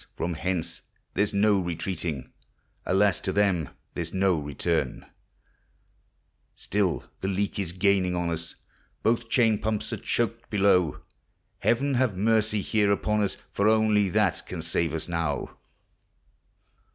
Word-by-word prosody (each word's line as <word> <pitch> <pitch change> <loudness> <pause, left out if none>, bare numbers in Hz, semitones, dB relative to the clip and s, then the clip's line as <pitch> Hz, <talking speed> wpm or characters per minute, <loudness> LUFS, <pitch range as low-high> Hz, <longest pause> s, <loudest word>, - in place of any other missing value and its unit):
from 85 +1 -2
hence 85 0 -3 0.3
there 100 - +2
's 105 - -2
no 100 0 +3
retreating, 85 -5 -4 0.5
Alas! 100 +1 +3
to 95 - -1
them 95 -6 +1 0.2
there 85 - -2
's 85 - -8
no 95 -3 +3
return! 75 -1 -2 1.5
Still 100 -3 -1 0.2
the 95 - -3
leak 100 +1 -1
is 95 -4 -2
gaining 90 0 +2
on 85 -1 -1
us! 85 0 -4 0.5
Both 115 0 +1
chain 115 -4 +3
pumps 110 -1 -2
are - - -2
choked 115 0 -2
below: 95 -6 +3 0.6
Heaven 135 +4 +2
have 125 -6 +1
mercy 110 0 +2
here 105 -2 +2
upon 105 +1 +1
us! 100 -2 -1
For 100 - +1
onlv 110 -3 +3
that 105 -6 +2
can 85 -3 -5
save 85 -1 0
us 80 0 -4
now. 85 -4 -2
100 Hz, 140 wpm, -27 LUFS, 85-105 Hz, 1.5 s, no